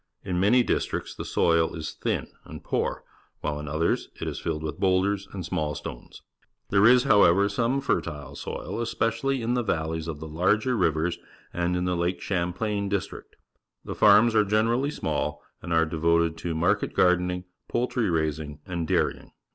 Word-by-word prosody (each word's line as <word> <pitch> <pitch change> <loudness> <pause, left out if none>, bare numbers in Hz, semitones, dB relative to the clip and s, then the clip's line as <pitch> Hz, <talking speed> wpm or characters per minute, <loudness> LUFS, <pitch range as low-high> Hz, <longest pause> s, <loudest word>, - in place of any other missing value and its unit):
In 90 -1 -2
many 115 +6 +4
districts - - -2
the - - -6
soil 85 0 +2
is 80 -1 -5
thin - - -2 0.2
and - - -10
poor, - - -2 0.4
while 75 0 -2
in 75 - -7
others 80 +3 0
it - - -4
is - - -4
filled 75 - -3
with 80 0 -5
boulders 95 +1 +1
and 95 -4 -6
small 75 -3 -2
stones. - - -9 0.5
There 100 +2 +5
is, 125 0 +6
however, 100 -6 +5
some 120 +6 0
fertile 70 - -2
soil, 115 - -5
especially 115 +3 -1
in 120 +2 0
the 125 - +1
valleys 80 -5 -2
of 80 -3 -5
the 80 - -7
larger 105 +10 +1
rivers 85 -3 0 0.3
and 90 +1 0
in 90 - -1
the 90 0 0
Lake 85 +1 -1
Champlain 100 +3 -2
district. 100 -2 -4 0.5
The - - -4
farms 105 +3 +6
are 110 -1 +5
generally 115 +6 +1
small - - -3 0.2
and 90 - -7
are 80 0 +4
devoted 85 +1 +1
to 85 -1 -3
market 85 +3 +1
gardening, 90 0 +2 0.2
poultry 120 -2 0
raising, 80 -2 -2
and 85 -2 -3
dairying. 90 0 -1
90 Hz, 170 wpm, -26 LUFS, 80-105 Hz, 0.5 s, is